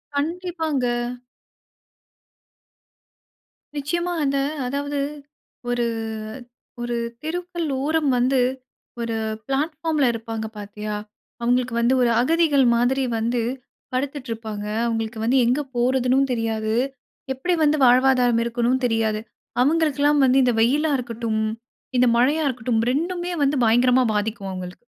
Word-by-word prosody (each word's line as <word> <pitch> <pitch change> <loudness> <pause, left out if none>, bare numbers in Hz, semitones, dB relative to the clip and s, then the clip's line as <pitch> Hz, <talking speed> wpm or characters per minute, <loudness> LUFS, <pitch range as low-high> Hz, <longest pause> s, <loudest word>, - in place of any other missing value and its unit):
கண்டிப்பாங்க. 320 -3 -1 2.9
நிச்சயமா. 345 +5 -1
அந்த 275 0 +1 0.3
அதாவது 285 +2 -2 0.7
ஒரு, 240 -1 +1 1.0
ஒரு 240 0 -2 0.3
தெருக்கள் 345 0 -3 0.2
ஓரம் 310 -1 +1
வந்து, 255 +2 +2 0.6
ஒரு 230 -1 -2 0.3
பிளாட்ஃபார்ம்ல 305 +1 0
இருப்பாங்க 225 -1 -4
பாத்தியா, 210 +1 -5 0.5
அவுங்களுக்கு 245 0 +1
வந்து 240 +3 +3
ஒரு 240 - +4
அகதிகள் 300 -1 +3
மாதிரி 250 +3 +2
வந்து 235 +2 0 0.5
படுத்துட்டுருப்பாங்க. 230 -6 -4 0.2
அவுங்களுக்கு 225 -1 -2
வந்து 255 +3 +3
எங்க 255 +5 +2
போறதுன்னும் 255 +2 +2
தெரியாது. 220 -1 -1 0.6
எப்படி 355 +8 -1
வந்து 300 0 +3
வாழ்வாதாரம் 250 -1 +4
இருக்கணுன்னு 240 +2 0
தெரியாது. 220 -2 0 0.4
அவுங்களுக்கெல்லாம் 295 -1 +3
வந்து 260 +1 +4
இந்த 245 - +3
வெயிலா 295 +6 +2
இருக்கட்டும், 230 -2 -2 0.6
இந்த 250 - +5
மழையா 290 +6 +3
இருக்கட்டும், 235 -2 -1
ரெண்டுமே 350 +5 -2
வந்து 280 +1 +2
பயங்கரமா 245 +3 +4
பாதிக்கும் 210 -2 -2
அவுங்களுக்கு. 185 +4 -8
255 Hz, 105 wpm, -23 LUFS, 230-290 Hz, 2.9 s, இந்த